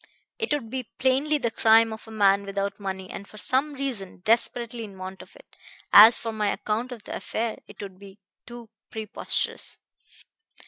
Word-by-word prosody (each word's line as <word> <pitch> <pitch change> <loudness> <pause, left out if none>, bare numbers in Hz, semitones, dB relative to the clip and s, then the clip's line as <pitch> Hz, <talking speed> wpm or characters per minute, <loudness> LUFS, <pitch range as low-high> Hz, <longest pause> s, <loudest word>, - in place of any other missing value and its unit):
It 450 - -2
would 265 -7 -1
be 255 -3 -4
plainly 270 +4 +2
the 240 -5 -1
crime 225 0 +4
of 220 - -11
a - - -10
man 200 -2 +3
without 200 +1 -3
money, 190 -2 -5
and 200 - -8
for 215 - -14
some 270 +7 0
reason 240 -10 -5
desperately 235 +1 +1
in 200 -3 -10
want 185 +1 -7
of - - -16
it. - - -19 0.4
As 220 +3 +10
for 225 - -4
my 210 -2 0
account 225 +4 -2
of 235 -4 -8
the - - -6
affair, 225 0 -3
it 210 - -15
would 190 -2 -10
be 200 -1 -13 0.3
too 240 -2 -11 0.2
preposterous. 220 -1 -2
220 Hz, 180 wpm, -26 LUFS, 200-245 Hz, 0.4 s, As